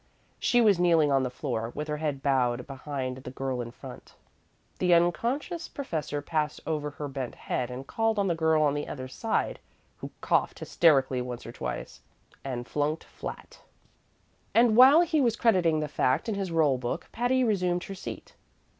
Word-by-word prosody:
She 245 - +3
was 205 -5 +4
kneeling 165 -4 +4
on 135 -1 +3
the 130 - -1
floor, 120 -3 -3
with 150 +1 -4
her 150 0 -2
head 150 -3 -3
bowed 125 -3 +1
behind 135 -2 -5
the 130 - -8
girl 130 -1 -3
in 120 - -6
front. 120 - -12 0.6
The 180 -1 +4
unconscious 240 - 0
professor 155 - -4
passed 150 -1 -1
over 150 -2 -2
her 145 +1 -6
bent 135 -3 -5
head 125 -1 -3
and 125 +2 -7
called 225 +6 0
on 200 - +2
the 175 - +2
girl 160 -1 +2
on 145 -2 +2
the 145 0 -3
other 130 -2 -6
side, 220 - -2 0.4
who - - -7
coughed - - +1
hysterically 135 -6 +3
once 125 -1 -6
or 115 - -7
twice, 60 - -6 0.4
and 125 -3 -4
flunked 150 +2 -1
flat; - - -9 0.9
and 230 -1 +5
while 265 +7 +8
he 320 -3 +2
was 235 -4 +2
crediting 180 -10 +2
the 150 - -2
fact 135 - 0
in 220 - 0
his 195 -2 -3
roll 150 -6 +2
book 120 -1 -4
Patty 250 +2 +1
resumed 180 -6 +1
her 195 - -7
seat. 190 - -8
150 Hz, 180 wpm, -28 LUFS, 130-195 Hz, 0.9 s, while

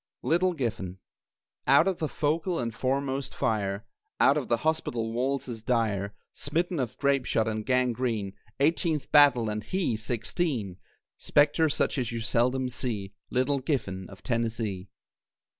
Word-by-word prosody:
LITTLE 180 +3 +2
GIFFEN 110 - -3 0.7
Out 140 +6 +6
of 190 -3 0
the 155 - -1
focal 165 +4 0
and 115 -2 -2
foremost 135 +3 -1
fire, 105 -1 -1 0.3
Out 140 - +6
of 145 -4 -1
the 120 - +2
hospital 120 -8 0
walls 130 +3 -1
as 115 -3 -6
dire, 105 -4 0 0.2
Smitten 170 +3 -1
of 125 -4 -3
grape 140 -2 +2
shot 110 0 +1
and 110 -1 -2
gangrene 120 -5 0 0.3
(Eighteenth 155 +1 +1
battle 140 -6 +6
and 105 0 -3
he 185 - -1
sixteen) 115 - -2 0.4
Spectre 150 +2 +3
such 145 - 0
as 125 -2 -2
you 115 - -3
seldom 125 +3 +1
see, 110 -6 -3 0.2
Little 130 +2 +1
Giffen 100 - -2
of 95 - -13
Tennessee. 115 -5 -2
125 Hz, 140 wpm, -28 LUFS, 110-145 Hz, 0.7 s, Out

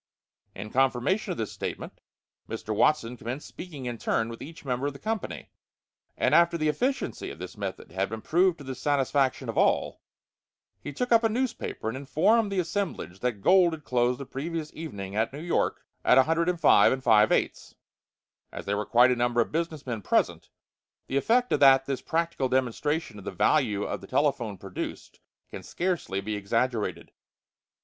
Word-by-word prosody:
In 105 +2 -7
confirmation 135 - +1
of 175 - -4
this 110 - -3
statement, - - -6 0.5
Mr. 110 -1 -4
Watson 125 -1 +2
commenced 125 +6 -6
speaking 150 -8 -9
in 120 -2 -4
turn 115 0 0
with 115 - -9
each 160 0 -10
member 130 +1 -1
of 145 - -3
the - - -10
company; 220 +6 -4 0.7
and - - +1
after 170 0 +5
the 155 -1 +1
efficiency 260 - -2
of - - -9
this 90 +2 -8
method 100 -5 -6
had 95 +2 -1
been 110 0 -6
proved 180 +1 +3
to 145 - -11
the 135 -1 -5
satisfaction 135 -1 0
of - - -1
all, - - +1 0.8
he 145 - -6
took 245 - -3
up 230 0 +5
a 225 - +3
newspaper 240 - -3
and 115 - -2
informed 200 - +2
the 195 - -2
assemblage 170 - -3
that 115 -5 -2
gold 180 -3 +5
had 155 -1 -7
closed 125 0 +1
the 140 - -6
previous 155 +4 -5
evening 100 -12 -7
at 110 +1 +1
New 140 - -8
York 170 +2 -1 0.2
at - - +5
105 165 -2 +4
5/8. 110 -3 +2 0.8
As - - -7
there 100 +1 -1
were 105 - -3
quite 125 +2 +5
a - - +2
number 120 0 +1
of 115 - +1
business 160 -2 -3
men 120 -4 -4
present, - - 0 0.6
the 135 - -2
effect 245 - +2
that 135 -2 +6
this 135 -1 -3
practical 165 -5 -1
demonstration 130 0 -1
of - - -12
the - - -2
value 105 - +2
of - - -4
the 95 - -11
telephone 130 -8 0
produced 95 0 -7 0.3
can - - -7
scarcely 175 - -2
be 105 +1 -3
exaggerated. 115 +3 -1
135 Hz, 175 wpm, -27 LUFS, 115-165 Hz, 0.8 s, that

